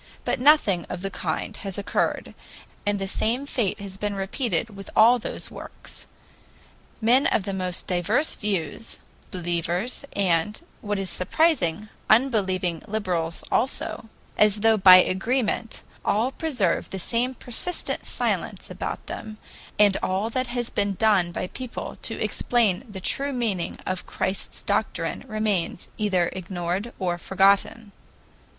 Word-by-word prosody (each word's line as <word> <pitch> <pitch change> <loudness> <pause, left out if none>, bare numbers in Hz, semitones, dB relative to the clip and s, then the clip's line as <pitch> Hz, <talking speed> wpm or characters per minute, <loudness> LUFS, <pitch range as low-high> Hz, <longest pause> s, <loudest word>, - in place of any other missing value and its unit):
But - - 0
nothing 250 - +4
of 180 - -5
the 195 - -3
kind 215 - -3
has 195 -2 -5
occurred, 200 - -1 0.5
and 205 0 +2
the 195 0 -3
same 235 +7 0
fate 215 -8 0
has 195 -1 -7
been 205 0 -2
repeated 205 +2 -1
with 195 -1 -9
all 240 +3 +7
those - - -4
works. - - -10 0.9
Men 240 +5 +4
of 205 - +1
the 195 - -3
most 185 -2 -2
diverse 190 - +1
views, 200 -1 -2 0.3
believers, 175 - -1
and, 190 +1 +1 0.2
what 205 -1 -2
is 195 -2 -1
surprising, 215 - +1 0.2
unbelieving 190 - +2
liberals 180 -6 -1
also, 235 -2 -1 0.3
as 210 -1 +4
though 225 0 +5
by 185 -3 +9
agreement, 225 +5 +1 0.2
all 225 +6 +1
preserve 255 - 0
the 190 - -5
same 235 +7 0
persistent 255 +10 -2
silence - - -2
about - - -5
them, 215 -1 -7 0.4
and 205 -2 +5
all 195 +5 -1
that 255 +1 -1
has 240 -1 -3
been 200 -1 0
done 195 -5 +3
by - - -3
people 250 +6 -6
to - - 0
explain 225 -5 +1
the 190 -2 -7
true 280 +8 0
meaning 220 -8 -1
of 185 -1 -3
Christ's 190 +1 -3
doctrine - - -1
remains 215 -6 -1
either 185 -5 +1
ignored 185 +3 -3
or 175 -2 -1
forgotten. 200 +3 +2
205 Hz, 135 wpm, -25 LUFS, 185-230 Hz, 0.9 s, by